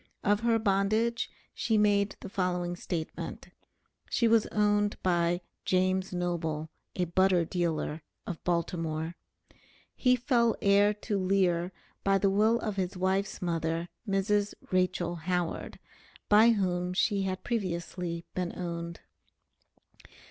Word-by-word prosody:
Of 205 +1 +3
her 230 0 +2
bondage 215 +3 +1 0.2
she 220 -2 +1
made 205 -1 +3
the - - -6
following 180 -2 -1
statement: 170 -2 -5 0.6
She 235 - +2
was 225 -1 +4
owned 205 0 +1
by 175 -1 +2 0.2
"James 185 +1 +1
Noble, 165 -3 -2 0.2
a 180 - +1
Butter 180 0 +3
Dealer" 165 -3 -2 0.2
of 175 -5 -6
Baltimore. 165 -1 -1 0.8
He 250 -1 +4
fell 235 -2 +2
heir 200 +1 +4
to 210 -1 -2
Lear 185 -2 +2 0.3
by 195 0 +4
the 195 0 +2
will 215 +4 +3
of 210 -3 -3
his 185 0 -2
wife's 190 +1 0
mother, 165 0 -1 0.2
Mrs. 205 +1 +1 0.2
Rachel 180 -2 +1
Howard, 175 +1 -2 0.5
by 215 +3 +7
whom 180 -4 +1
she 200 +2 +2
had 190 -1 -3
previously 175 -5 -3
been 180 -1 -2
owned. 170 -1 -5
185 Hz, 120 wpm, -29 LUFS, 175-205 Hz, 0.8 s, by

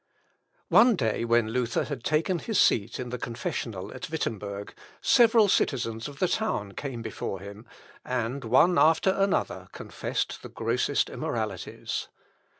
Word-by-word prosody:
One 240 -2 +6
day 115 - 0
when 115 -1 +2
Luther 120 0 0
had 145 -3 -6
taken 165 +4 +1
his 220 +2 -1
seat 110 0 +3
in 125 -1 -4
the 125 0 -4
confessional 110 -4 -4
at 185 - -7
Wittemberg, 105 -9 -4 0.3
several 230 -4 +5
citizens 115 - 0
of 145 -1 -10
the 185 - +2
town 170 - -1
came 120 +1 -6
before 105 -3 -4
him, 100 +4 -10 0.4
and 125 +2 -2
one 150 +10 +4
after 160 +4 +4
another 195 +1 0
confessed - - -4
the - - -9
grossest - - 0
immoralities. - - -4
125 Hz, 140 wpm, -27 LUFS, 110-170 Hz, 0.4 s, One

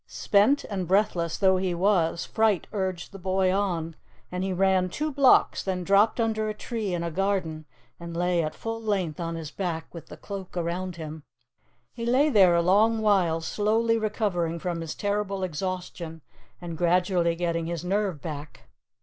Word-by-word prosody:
Spent 215 +8 +2
and 190 -4 -4
breathless 180 -4 +1
though 190 -2 +4
he 185 -1 -1
was, 170 -3 +1
fright 220 -5 +1
urged 190 -3 -3
the 195 - -10
boy 185 0 +1
on, 170 -5 -1 0.4
and 180 +1 -2
he 190 - -1
ran 185 0 +2
two 305 - -2
blocks, 275 -2 +4
then 185 -2 -2
dropped 200 +5 +3
under 220 -1 0
a 215 - -4
tree 220 -3 -4
in 170 - -3
a 170 - -3
garden 180 -4 -1 0.3
and 170 -1 -7
lay 175 0 +2
at 155 -1 -3
full 225 0 -5
length 190 -8 -1
on 165 -1 -3
his 160 -2 -6
back 170 -4 -4
with 170 - -9
the - - -11
Cloak 195 -3 -7
around 175 +1 -2
him. 160 -1 -7 0.7
He 235 - -6
lay 270 +5 +4
there 190 -7 +6
a 170 - +3
long 220 +5 +3
while, 180 -6 +3
slowly 220 +6 +1
recovering 200 -6 -1
from 170 0 -3
his 165 -2 -5
terrible 200 -1 -2
exhaustion 175 -2 -5 0.4
and 170 -2 -7
gradually 175 -1 +2
getting 170 -1 -1
his 170 0 -4
nerve 195 -4 -1
back. 150 -2 -8
185 Hz, 175 wpm, -26 LUFS, 170-205 Hz, 0.7 s, there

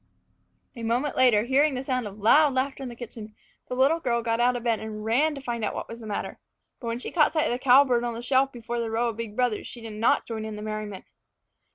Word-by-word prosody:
A 235 - -8
moment 240 +6 -1
later, 245 -5 +4
hearing 270 +4 +2
the 255 - -3
sound 255 -4 -1
of 200 0 -10
loud 270 +7 +5
laughter 270 +1 -1
in 260 - -5
the 240 - -9
kitchen, 220 -3 -9 0.3
the 250 - -4
little 275 +6 +3
girl 235 -6 0
got 230 0 0
out 245 +1 +3
of 240 - -4
bed 230 -2 +1
and 215 -1 -6
ran 290 +8 +2
to 275 - -7
find 235 -3 -4
out - - -2
what - - -5
was 230 - -9
the 225 - -9
matter. 205 - -4 0.4
But 235 - -7
when 230 0 -1
she 245 - -6
caught 310 -3 +3
sight 310 -2 +2
of - - 0
the 245 - -1
cowbird 255 -2 +5
on 240 -1 -2
the 235 - -7
shelf 265 +2 +2
before 240 -1 -5
the 230 -1 -2
row 235 +2 0
of 225 - -6
big 225 -3 -6
brothers, 245 -3 0
she 245 - -10
did 225 -2 -8
not 215 +2 +2
join 225 -2 -5
in 220 -1 -5
the 210 - -7
merriment. 215 -2 -5
240 Hz, 265 wpm, -26 LUFS, 225-260 Hz, 0.4 s, loud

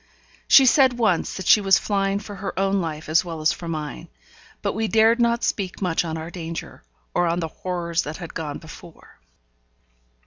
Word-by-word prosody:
She 270 - +8
said 260 0 +5
once 215 -8 0
that 190 - -6
she 210 - +6
was 195 -1 +5
flying 195 -1 0
for 205 0 -8
her 195 0 -5
own 195 0 +1
life 155 -2 -5
as 155 +2 +3
well 165 -3 -6
as 155 +1 +2
for 170 - -7
mine; 155 -2 -5 0.6
but - - 0
we 220 +2 -1
dared 225 +2 +4
not 235 0 +1
speak 190 -3 -2
much 180 -4 0
on 160 -1 -4
our 160 +2 -7
danger, 165 - -7 0.3
or 175 - +2
on 170 +1 0
the 165 - -2
horrors 170 0 -3
that 150 +2 -6
had 175 -3 -8
gone 150 -3 -4
before. 160 +1 -14
180 Hz, 195 wpm, -23 LUFS, 165-205 Hz, 0.6 s, She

